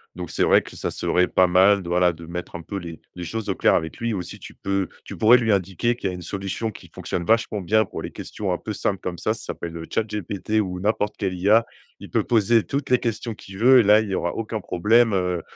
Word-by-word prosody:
Donc, 90 -2 -6
c'est - - -3
vrai - - +5
que - - -12
ça - - -3
serait 90 0 +1
pas 95 - +4
mal 95 +2 +4
de, 85 - -7
voilà, 90 0 +3
de 85 0 -11
mettre 90 +1 -7
un 85 - -6
peu 100 - -5
les 85 -3 -8
les 90 - -7
choses 105 +5 -4
au 95 - 0
clair - - +3
avec 80 0 -2
lui 115 -1 -2
aussi. 90 -2 -6
Tu - - -11
peux 95 -2 -2 0.2
tu - - -8
pourrais 115 +3 +6
lui 115 -3 +1
indiquer 100 +5 0
qu'il 100 - -3
y - - -3
a - - -6
une 90 - -8
solution 100 +5 -3
qui - - -14
fonctionne 85 - -4
vachement 110 0 +1
bien 110 +4 +2
pour - - -7
les - - -5
questions 100 -3 -5
un 90 - 0
peu 110 - -6
simples 100 -1 -1
comme 90 -2 -5
ça 110 +4 0
ça 110 - -9
s'appelle, 85 0 -6
heu, 80 - -7
Chat 110 - +1
GPT 105 0 -5
ou 90 -3 -2
n'importe 105 +1 0
quelle 95 -3 -2
IA. 105 +6 +4 0.3
Il - - -10
peut - - +1
poser 115 0 +3
toutes 140 0 -3
les 125 - +5
questions 115 -1 -3
qu'il 95 -1 -12
veut 130 +3 +7
et - - +5
là, 105 +1 +6
il 110 - -5
y 95 - -1
aura 85 - -1
aucun 115 0 -4
problème, 110 +5 +3
heu, 90 -2 0
100 Hz, 270 wpm, -23 LUFS, 90-110 Hz, 0.3 s, veut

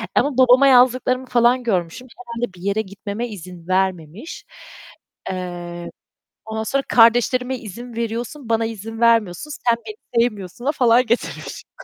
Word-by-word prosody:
ama 280 -3 +1
babama 260 +2 +6
yazdıklarımı 255 0 +4
falan 245 +1 +3
görmüşüm, 190 +2 -2
herhâlde 235 -3 -5
bir 175 - -15
yere 200 +3 0
gitmeme 205 +3 -6
izin 180 -4 -10
vermemiş. 185 - -2 0.9
Eee, 175 -1 -6 0.6
ondan 220 0 -4
sonra 275 +5 -1
kardeşlerime 250 +2 +4
izin 235 +3 -9
veriyorsun, 235 +3 -4
bana 225 0 +2
izin 225 0 -7
vermiyorsun, 230 - +2 0.2
sen 230 - +3
beni 250 - -1
sevmiyorsun'a 230 +4 -3
falan 245 -3 +3
getirmişim. 235 +2 -3
230 Hz, 125 wpm, -21 LUFS, 195-250 Hz, 0.9 s, babama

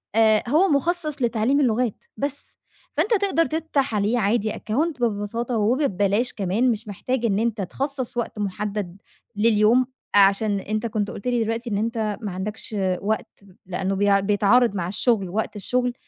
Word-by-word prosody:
آآ، 220 -1 +4
هو 325 +7 +4
مخصَص 305 0 0
لتعليم 235 +3 +2
اللغات 245 -4 0
بس، 285 0 -4 0.4
فأنت 430 - +1
تقدر 380 -5 +2
تفتح 305 -7 -1
عليه 210 +4 +1
عادي 215 +1 +1
account 285 +6 -2
ببساطة 230 +2 -1
وب 235 +7 +2
ببلاش 205 +1 +1
كمان، 210 +6 +1
مش 220 0 -4
محتاج 240 +5 -2
إن 205 -3 +1
أنت 225 -2 -1
تخصص 260 +6 -4
وقت 235 -2 -3
محدد 200 -2 -3 0.4
لليوم 220 +3 +4 0.3
عشان 200 +1 +4
أنت 215 +3 -3
كنت 210 -2 -2
قُلت 200 - -7
لي 240 -2 +1
دلوقتي 230 +2 -3
إن 205 - -1
أنت 220 -1 -1
ما 210 -3 -4
عندكش 210 +4 -5 0.3
وقت 215 +2 -3 0.3
لأنه 190 +1 -2
بي 200 0 +3
بيتعارض 205 +3 +3
مع 175 -3 -2
الشغل 205 -1 +1
وقت 215 +3 -2
الشغل، 245 +4 -1
220 Hz, 155 wpm, -23 LUFS, 205-250 Hz, 0.4 s, آآ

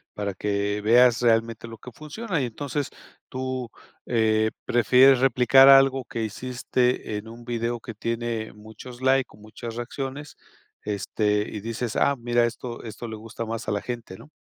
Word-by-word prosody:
para 100 -1 -3
que 100 +1 -1
veas 120 +2 +5
realmente 115 -1 +1
lo 115 0 -10
que 125 - -11
funciona, 165 - -4
y - - 0
entonces, 140 +4 -4 0.4
tú, 130 -2 -4 0.3
eh, 110 -2 +2
prefieres 130 +2 +5
replicar 135 +1 +6
algo 135 -1 +6
que 115 -1 -4
hiciste 125 0 -1
en 105 +2 -8
un 115 +1 -11
video 120 0 -2
que 115 -1 -9
tiene 115 0 -3
muchos 110 +4 -12
likes 130 0 +2
o - - -16
muchas 110 +2 -9
reacciones, 135 +4 -6 0.5
este, 105 +1 -1
y 105 - -6
dices: 115 +1 -4
"Ah, 140 - +3
mira, 120 0 +2
esto 120 0 -6
esto 115 +1 -7
le 110 - -6
gusta 110 +1 -7
más 115 +1 -5
a - - 0
la 100 -1 -1
gente", 120 -6 -6
¿no? 145 - -15
120 Hz, 165 wpm, -25 LUFS, 110-130 Hz, 0.5 s, replicar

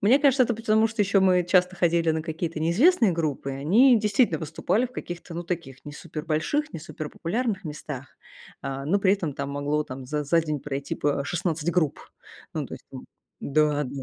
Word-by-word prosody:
Мне 225 +7 +5
кажется, 275 -3 +4
это 235 - -1
потому, 220 0 +2
что 220 -1 0
еще 200 0 +3
мы 180 -2 +4
часто 180 +1 +2
ходили 170 -2 +2
на 160 0 -1
какие-то 165 0 -4
неизвестные 225 - +4
группы, 155 -4 -2
и - - -4
они 220 - +5
действительно 210 - +2
выступали 160 - 0
в 250 - -19
каких-то, 175 -5 -7
ну, 170 - -3
таких 170 -7 -5
не 145 - -8
супер 155 0 -7
больших, 230 - -1
не - - -5
супер 155 -1 -7
популярных 210 +2 -2
местах. 145 -3 -7 0.5
А, 135 0 -4
но 190 +7 +2
при 195 -1 +3
этом 170 -8 -2
там 140 0 -4
могло 145 +2 -1
там 130 -1 -8
за 150 +1 -2
за 165 +4 +3
день 155 -3 -3
пройти 140 -1 -4
по 145 -1 0
16 170 -1 -1
групп. 160 -5 0 0.5
Ну, - - -2
то - - -7
есть - - -13
там - - -8 0.4
н-да 150 0 +2
да. 135 +1 -6
165 Hz, 205 wpm, -25 LUFS, 150-200 Hz, 0.5 s, Мне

